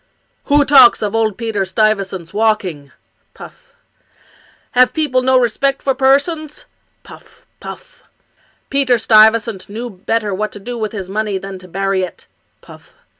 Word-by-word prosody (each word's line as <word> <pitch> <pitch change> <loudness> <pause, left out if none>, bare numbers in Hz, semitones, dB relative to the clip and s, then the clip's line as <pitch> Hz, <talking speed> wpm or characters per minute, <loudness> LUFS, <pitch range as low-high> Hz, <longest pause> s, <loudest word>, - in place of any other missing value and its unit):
"Who 290 0 +3
talks 265 -6 +6
of 205 0 -2
old 220 -3 0
Peter 225 -4 -2
Stuyvesant's 195 -3 -1
walking? 200 -10 -1 0.4
(puff). - - -14 1.0
Have 250 0 +3
people 290 -5 0
no 260 0 +3
respect 255 +3 0
for 270 - +1
persons? 285 +4 0 0.4
(puff - - -17
— - - -47
puff). - - -11 0.7
Peter 270 -3 +2
Stuyvesant 220 -2 +3
knew 230 +4 -6
better 205 +2 -2
what 210 +3 -3
to 205 - -9
do 240 +5 -7
with 220 -2 -4
his 195 -4 -6
money 210 0 -2
than 195 0 -8
to 185 - -14
bury 195 +1 -1
it 180 -2 -7 0.4
(puff). - - -17
220 Hz, 145 wpm, -16 LUFS, 195-255 Hz, 1.0 s, talks